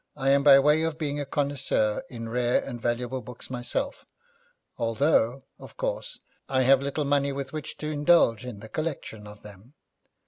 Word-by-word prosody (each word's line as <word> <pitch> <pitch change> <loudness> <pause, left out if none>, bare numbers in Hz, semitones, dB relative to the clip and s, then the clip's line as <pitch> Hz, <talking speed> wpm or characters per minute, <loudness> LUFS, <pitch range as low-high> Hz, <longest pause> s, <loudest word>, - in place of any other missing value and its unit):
I 135 -1 0
am 140 0 +4
by 140 -1 +8
way 150 +3 +4
of 160 -1 -1
being 145 -2 -2
a 145 - -4
connoisseur 135 -7 0
in 115 -2 -7
rare 120 +1 +1
and 120 -3 -7
valuable 120 +2 -2
books 125 +1 -10
myself, 120 -1 -2 0.7
although, 120 +1 +1 0.2
of - - -13
course, - - -3 0.3
I 130 -1 +2
have 135 +1 +5
little 140 +2 -2
money 140 0 +1
with 135 0 -5
which 155 -1 -6
to 155 0 -4
indulge 145 -7 +3
in 120 -5 -8
the 110 - -9
collection 135 -7 -5
of 105 0 -13
them. 105 +7 -14
135 Hz, 175 wpm, -26 LUFS, 120-145 Hz, 0.7 s, by